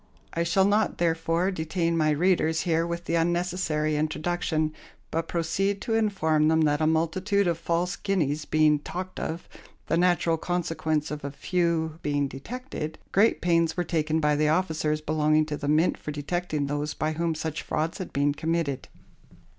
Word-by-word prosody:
I 165 - -1
shall 180 +3 +3
not, 210 +2 +2
therefore, 165 +2 +1
detain 170 0 -1
my 155 -2 +2
readers 160 0 +2
here 165 -1 +1
with 170 0 -4
the - - -2
unnecessary 170 -2 0
introduction, 155 0 -1 0.4
but 165 +1 -1
proceed 195 +4 0
to 225 - -2
inform 175 -9 +2
them 160 0 +3
that 150 -1 +2
a 155 - +3
multitude 185 +6 +1
of 170 -2 0
false 170 +2 0
guineas 155 -7 -1
being 155 -1 +3
talked 185 +5 -6
of 165 +2 -4 0.4
the 165 - +1
natural 175 -2 +2
consequence 160 -3 -1
of 150 -1 -5
a 140 - -3
few 165 +1 -1
being 145 -1 0
detected 155 - -6
great 210 +4 +3
pains 170 -1 +2
were 175 - +1
taken 160 -2 0
by 150 -1 +2
the 150 +1 +2
officers 155 -2 0
belonging 155 0 +2
to 150 -1 -3
the 145 - -5
Mint 155 +4 +2
for - - -7
detecting 150 0 -2
those 145 +1 -2
by 155 - -1
whom 165 +1 -1
such 155 0 -3
frauds 160 +5 -2
had 185 - -5
been 145 +1 +1
committed. 160 -3 -2
160 Hz, 170 wpm, -26 LUFS, 155-175 Hz, 0.4 s, shall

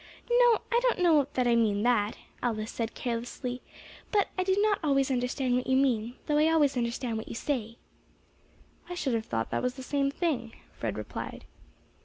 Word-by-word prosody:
"No, 480 -2 +5
I 475 - +4
don't - - +2
know 320 -6 +4
that 255 - +1
I 235 - +4
mean 210 -3 +2
that," 230 -4 +2 0.2
Alice 220 -2 -2
said 230 -1 -3
carelessly; 245 +1 -4 0.5
"but 410 -2 +2
I 370 - +1
do 380 +1 +1
not 415 -1 +3
always 275 -2 +2
understand 250 0 0
what 250 - -1
you 260 0 +3
mean, 245 -3 +1
though 295 0 +2
I 310 - +5
always 295 -4 +3
understand 235 -1 -1
what 220 - -8
you - - -6
say." 230 -3 -2 1.1
"I 355 - -4
should 280 -7 -1
have 225 -1 -1
thought 115 -1 -2
that - - 0
was 250 0 -1
the 260 - -8
same 275 +1 0
thing," 275 -7 -2 0.2
Fred - - -4
replied. - - -6
255 Hz, 190 wpm, -29 LUFS, 235-300 Hz, 1.1 s, No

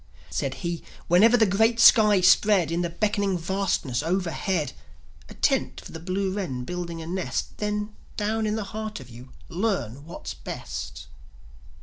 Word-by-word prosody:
Said 135 -1 -2
he: 170 -1 -2 0.3
"Whenever 220 +8 +6
the 225 - +5
great 225 +4 +2
skies 210 -6 +7
spread, 185 -4 +4
In 170 +1 0
the 175 - -1
beckoning 200 +1 0
vastness 175 -8 -1
overhead, 175 -3 -1 0.6
A - - -11
tent - - +1
for - - -11
the 160 - -7
blue 185 +3 -2
wren 145 -12 -3
building 170 +1 -5
a - - -8
nest, 175 -7 -3
Then, 210 0 -2 0.2
down 220 +1 0
in 210 - 0
the 220 - -2
heart 215 -2 -4
of 125 -2 -12
you, 125 +2 -12 0.2
learn 175 - -2
what's 170 - -7
best." - - -7
185 Hz, 155 wpm, -25 LUFS, 165-210 Hz, 0.6 s, skies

